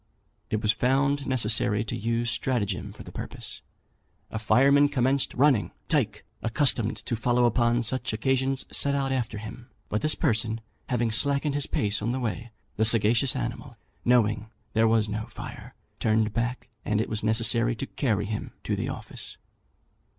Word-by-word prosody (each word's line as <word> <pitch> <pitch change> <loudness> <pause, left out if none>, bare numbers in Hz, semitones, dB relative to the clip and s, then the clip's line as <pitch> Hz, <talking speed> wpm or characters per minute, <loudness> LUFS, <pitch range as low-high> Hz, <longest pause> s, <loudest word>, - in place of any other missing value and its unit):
It 110 +1 -2
was 105 - +4
found 135 +4 +1
necessary 110 -4 +3
to 110 - -4
use 115 +2 -1
stratagem 115 -5 -2
for - - -11
the - - -11
purpose. - - -5 0.7
A 110 - -3
fireman 140 +6 +4
commenced 135 0 +1
running. 135 -5 +3 0.2
Tyke, 110 -10 0 0.2
accustomed 115 -2 +2
to 120 - -1
follow 120 +2 +2
upon 120 0 +2
such 130 +3 -1
occasions, 130 +4 0
set 140 0 +1
out 135 -1 -1
after 120 -5 -2
him; 115 +4 -9 0.2
but 105 - -1
this 155 - +2
person, 115 -6 0 0.3
having 120 -3 0
slackened 140 +5 +2
his 145 0 +1
pace 105 -1 0
on 120 +4 -1
the 130 - -2
way, 120 -1 -3 0.3
the 110 - +2
sagacious 115 +4 +4
animal, 120 0 -5 0.3
knowing 110 -3 +2 0.2
there 115 0 +3
was 110 -1 +3
no 110 +1 -4
fire, - - -10 0.2
turned 110 -1 +1
back, 120 +2 -2 0.2
and 105 0 0
it 110 - 0
was 110 - -2
necessary 115 +2 +3
to 135 - -4
carry 110 -8 -1
him 105 +1 -5
to - - -1
the - - -3
office. - - -7
120 Hz, 165 wpm, -26 LUFS, 110-130 Hz, 0.7 s, was